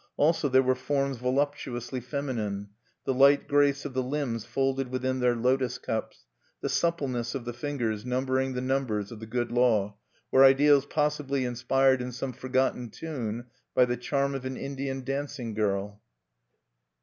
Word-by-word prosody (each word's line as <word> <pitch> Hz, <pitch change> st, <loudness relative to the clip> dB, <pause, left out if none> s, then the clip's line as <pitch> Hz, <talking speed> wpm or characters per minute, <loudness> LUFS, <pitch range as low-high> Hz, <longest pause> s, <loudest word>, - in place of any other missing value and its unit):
Also 150 Hz, -1 st, +3 dB
there 130 Hz, 0 st, +5 dB
were 130 Hz, 0 st, +3 dB
forms 135 Hz, +1 st, -1 dB
voluptuously 130 Hz, -1 st, -1 dB
feminine: 115 Hz, -7 st, -3 dB, 0.4 s
the 135 Hz, -, +1 dB
light 140 Hz, +2 st, +5 dB
grace 145 Hz, -1 st, +3 dB
of 145 Hz, -, -5 dB
the 130 Hz, -, 0 dB
limbs 130 Hz, -4 st, -2 dB
folded 135 Hz, +2 st, 0 dB
within 130 Hz, +1 st, -1 dB
their 125 Hz, -1 st, +3 dB
lotos 125 Hz, +1 st, +1 dB
cups, 110 Hz, -3 st, -4 dB, 0.3 s
the -, -, -3 dB
suppleness 135 Hz, -9 st, 0 dB
of 130 Hz, -3 st, -4 dB
the 120 Hz, -, -4 dB
fingers 120 Hz, -5 st, -2 dB
numbering 130 Hz, +1 st, 0 dB
the 125 Hz, -, -2 dB
numbers 125 Hz, -6 st, -1 dB
of 115 Hz, -, -8 dB
the 110 Hz, -, -8 dB
Good 120 Hz, +1 st, -2 dB
Law, 110 Hz, -5 st, +2 dB, 0.3 s
were 130 Hz, -, +7 dB
ideals 140 Hz, +1 st, +6 dB
possibly 150 Hz, -3 st, 0 dB
inspired 130 Hz, +2 st, +2 dB
in 125 Hz, 0 st, -4 dB
some 130 Hz, +1 st, -4 dB
forgotten 130 Hz, -1 st, 0 dB
tune 120 Hz, -5 st, -5 dB, 0.3 s
by 125 Hz, -, +6 dB
the 125 Hz, 0 st, -1 dB
charm 140 Hz, +3 st, -1 dB
of 135 Hz, -2 st, -4 dB
an 130 Hz, 0 st, -4 dB
Indian 135 Hz, -1 st, -4 dB
dancing 135 Hz, -3 st, -3 dB
girl. 105 Hz, -1 st, -1 dB
130 Hz, 160 wpm, -28 LUFS, 120-140 Hz, 0.4 s, were